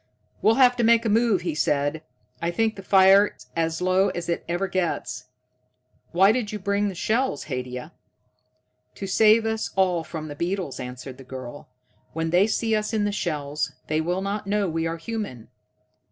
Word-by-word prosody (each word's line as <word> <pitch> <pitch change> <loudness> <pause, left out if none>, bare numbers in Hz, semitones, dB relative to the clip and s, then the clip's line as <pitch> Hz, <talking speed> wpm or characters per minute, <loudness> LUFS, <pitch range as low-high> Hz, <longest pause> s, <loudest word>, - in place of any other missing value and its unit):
"We'll 220 - +4
have 250 -2 +5
to 240 - +1
make 230 0 +4
a - - +2
move," 220 -3 +3
he 170 -2 -2
said. 145 +1 0 0.4
"I 170 - 0
think 220 +5 0
the 195 - -8
fire's 195 +1 +4
as 165 +1 -1
low 185 +2 +3
as 175 0 -5
it 170 - -1
ever 175 +3 0
gets. 165 -9 -2 0.9
Why 190 +4 +5
did 225 -3 -1
you 215 - -3
bring 200 +1 0
the 195 - -4
shells, 220 - 0
Haidia?" 125 -2 -5 1.0
"To 195 - -6
save 220 +3 +4
us 220 0 -1
all 180 -3 +2
from 160 -1 -6
the 145 - -7
beetles," 175 -4 -3
answered 125 +1 -8
the - - -10
girl. 130 +1 -9 0.4
"When 160 0 -2
they 180 +4 +4
see 225 0 0
us 215 +1 -2
in 210 -2 +1
the 205 - 0
shells, 150 -6 -2 0.2
they 155 +1 +1
will 175 +3 -1
not 200 0 -3
know 205 0 +1
we 165 0 -1
are 165 0 -3
human. 165 - -6
185 Hz, 180 wpm, -24 LUFS, 155-210 Hz, 1.0 s, have